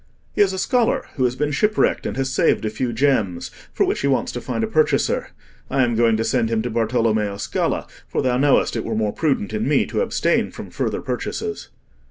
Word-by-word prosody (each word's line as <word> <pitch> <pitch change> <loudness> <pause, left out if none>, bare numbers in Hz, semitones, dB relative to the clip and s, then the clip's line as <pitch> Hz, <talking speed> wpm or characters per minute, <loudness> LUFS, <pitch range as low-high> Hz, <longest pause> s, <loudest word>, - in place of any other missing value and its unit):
"He - - +1
is 200 -2 +4
a 190 - -4
scholar 240 +4 +1
who 130 - +1
has 125 0 0
been 150 +2 -1
shipwrecked 210 +8 +1
and - - -4
has 135 0 -1
saved 120 - +2
a 105 - -1
few 120 +3 -2
gems, 115 -8 0 0.2
for - - +1
which - - -1
he 140 - 0
wants 135 -2 +1
to 120 - -5
find 225 - -2
a - - 0
purchaser. 155 -8 +1 0.4
I 135 - +2
am 120 -1 +1
going 115 -1 +3
to 115 - 0
send 115 -1 +1
him 110 -1 0
to 120 - -3
Bartolommeo 110 -3 +1
Scala, - - -1 0.2
for - - -1
thou 125 -1 +1
knowest 140 -2 +3
it 115 - -2
were 115 - -3
more 110 -1 0
prudent 135 -10 -1
in 110 +3 -1
me 145 -1 +3
to - - -2
abstain 480 - +1
from - - -9
further - - -2
purchases." 430 -1 -4
125 Hz, 225 wpm, -21 LUFS, 110-145 Hz, 0.4 s, is